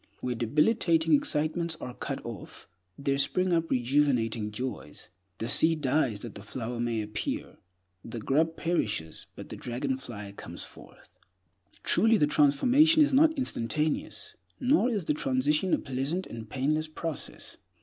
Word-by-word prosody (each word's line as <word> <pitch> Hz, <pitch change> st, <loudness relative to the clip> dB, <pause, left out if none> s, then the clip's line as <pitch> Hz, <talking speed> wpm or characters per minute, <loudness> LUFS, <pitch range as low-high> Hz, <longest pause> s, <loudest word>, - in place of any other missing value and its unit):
Where 125 Hz, -, -1 dB
debilitating 160 Hz, -, +2 dB
excitements 155 Hz, +3 st, +1 dB
are 125 Hz, -, -6 dB
cut -, -, -5 dB
off, -, -, -9 dB, 0.3 s
there 140 Hz, 0 st, 0 dB
spring 185 Hz, +5 st, +2 dB
up 165 Hz, -1 st, +1 dB
rejuvenating 125 Hz, -4 st, +1 dB
joys. 105 Hz, -, -6 dB, 0.3 s
The 115 Hz, -, -3 dB
seed 160 Hz, +4 st, +3 dB
dies 130 Hz, -6 st, +1 dB
that 120 Hz, -, -7 dB
the -, -, -9 dB
flower 115 Hz, +3 st, -5 dB
may 115 Hz, -2 st, -1 dB
appear; 105 Hz, 0 st, -4 dB, 0.5 s
the 115 Hz, -, -7 dB
grub 155 Hz, +8 st, +1 dB
perishes, 105 Hz, -, -2 dB
but -, -, -9 dB
the -, -, -6 dB
dragonfly 120 Hz, -5 st, -4 dB
comes -, -, -7 dB
forth. -, -, -15 dB, 0.6 s
Truly, 225 Hz, 0 st, +4 dB
the 150 Hz, -, +4 dB
transformation 250 Hz, -, +5 dB
is 290 Hz, -, +1 dB
not 315 Hz, +3 st, +5 dB
instantaneous; 150 Hz, -, -2 dB, 0.3 s
nor 255 Hz, -1 st, +3 dB
is 205 Hz, -8 st, -2 dB
the 150 Hz, -, +2 dB
transition 150 Hz, +6 st, +1 dB
a -, -, +4 dB
pleasant 140 Hz, +7 st, -2 dB
and 115 Hz, -2 st, -8 dB
painless 155 Hz, +5 st, 0 dB
process. 155 Hz, 0 st, -6 dB
145 Hz, 140 wpm, -28 LUFS, 120-165 Hz, 0.6 s, transformation